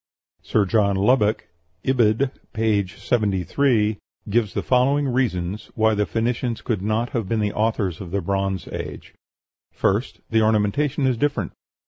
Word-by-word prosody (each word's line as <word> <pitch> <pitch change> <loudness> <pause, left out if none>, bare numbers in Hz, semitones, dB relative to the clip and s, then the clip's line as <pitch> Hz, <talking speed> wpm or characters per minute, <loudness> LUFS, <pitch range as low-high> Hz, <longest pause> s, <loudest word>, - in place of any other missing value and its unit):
Sir 105 -2 +1
John 100 0 +2
Lubbock 105 +1 +2 0.4
(Ibid., 125 0 +2 0.2
p. 110 -3 +1
73) 105 +2 +1 0.3
gives 110 -3 +1
the - - -1
following 135 +3 +2
reasons 105 -6 -1
why 110 0 +3
the 105 -1 0
Phoenicians 115 +1 -1
could 110 -6 -1
not 110 +4 -1
have 115 -6 -2
been 115 - +1
the 105 -1 0
authors 105 -6 -1
of 90 - -7
the 100 +3 -1
Bronze 95 -1 -2
Age: - - -7 0.6
First, 100 +6 -1
the 110 -1 +4
ornamentation 110 +7 +1
is 130 -3 +2
different. 125 - -1
110 Hz, 140 wpm, -23 LUFS, 100-120 Hz, 0.6 s, the